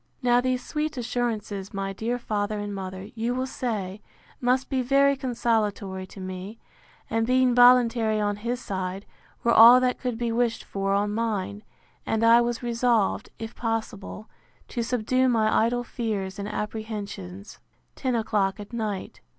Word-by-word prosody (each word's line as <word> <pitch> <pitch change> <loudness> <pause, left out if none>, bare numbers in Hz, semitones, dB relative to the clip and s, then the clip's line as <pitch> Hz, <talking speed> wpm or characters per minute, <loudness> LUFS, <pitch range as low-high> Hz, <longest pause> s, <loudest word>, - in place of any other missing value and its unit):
Now 245 0 +4
these 255 0 -1
sweet 305 -1 -2
assurances, 220 -5 -3
my 195 0 -2
dear 230 +5 -2
father 210 -2 -2
and 205 0 -4
mother, 190 +1 -6
you 235 +2 -2
will 255 +1 -1
say, 215 -6 -4 0.4
must 255 +1 +1
be 265 -2 0
very 275 +2 +4
consolatory 220 -7 -1
to 195 - -12
me; 185 +3 -6 0.5
and 225 0 0
being 255 0 +3
voluntary 240 -3 +5
on 205 -1 0
his 240 +4 -3
side, 190 -1 -4 0.4
were 235 - +3
all 235 +3 +9
that 250 0 +1
could 250 -3 -3
be 235 0 -1
wished 235 0 0
for 195 0 -1
on 205 +1 0
mine; 210 -2 -2 0.4
and 225 0 -1
I 230 +1 +7
was 240 0 -2
resolved, 235 -3 +1
if 225 0 -7
possible, 220 -2 -4 0.4
to 240 - -2
subdue 255 +2 +1
my 220 -2 +3
idle 245 +1 -1
fears 210 -6 -3
and 200 - -4
apprehensions. 210 -3 -6 0.4
Ten 255 -2 -1
o'clock 210 -4 0
at 205 +3 -9
night. 215 -4 -4
225 Hz, 155 wpm, -26 LUFS, 205-245 Hz, 0.5 s, all